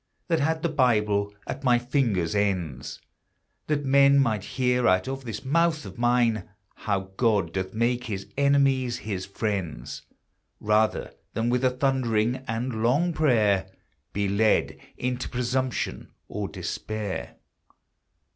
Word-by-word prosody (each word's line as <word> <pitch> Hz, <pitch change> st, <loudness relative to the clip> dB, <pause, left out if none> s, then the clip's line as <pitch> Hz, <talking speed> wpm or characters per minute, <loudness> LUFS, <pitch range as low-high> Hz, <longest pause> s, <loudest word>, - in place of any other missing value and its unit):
That 165 Hz, -2 st, +2 dB
had 160 Hz, +2 st, 0 dB
the 170 Hz, -, +2 dB
Bible 105 Hz, -8 st, +2 dB
at 135 Hz, -, -6 dB
my 125 Hz, -2 st, +4 dB
fingers' 120 Hz, -, 0 dB
ends; 90 Hz, -11 st, -1 dB, 0.7 s
That 145 Hz, -2 st, 0 dB
men 140 Hz, +1 st, +5 dB
might 110 Hz, -8 st, +2 dB
hear 125 Hz, -1 st, +2 dB
out 95 Hz, +3 st, +3 dB
of 135 Hz, 0 st, -5 dB
this 115 Hz, +2 st, -6 dB
mouth 160 Hz, +2 st, +2 dB
of -, -, -10 dB
mine 120 Hz, -4 st, +2 dB, 0.2 s
How 95 Hz, -2 st, -3 dB
God 105 Hz, -8 st, +2 dB
doth 95 Hz, +1 st, -3 dB
make 120 Hz, +2 st, +1 dB
his 100 Hz, -4 st, -4 dB
enemies 135 Hz, -3 st, +2 dB
his 100 Hz, -5 st, -4 dB
friends; 95 Hz, -, -3 dB, 0.6 s
Rather 105 Hz, +1 st, +1 dB, 0.2 s
than 115 Hz, +1 st, 0 dB
with 125 Hz, +1 st, +1 dB
a 130 Hz, -, +5 dB
thundering 125 Hz, -3 st, +1 dB
and 115 Hz, 0 st, -2 dB
long 145 Hz, +10 st, +2 dB
prayer 105 Hz, -11 st, +2 dB, 0.4 s
Be 100 Hz, +1 st, -1 dB
led 105 Hz, +2 st, +2 dB, 0.2 s
into 125 Hz, 0 st, -2 dB
presumption, 125 Hz, +1 st, -2 dB, 0.2 s
or -, -, -4 dB
despair. 105 Hz, -12 st, -5 dB
120 Hz, 130 wpm, -26 LUFS, 100-130 Hz, 0.7 s, men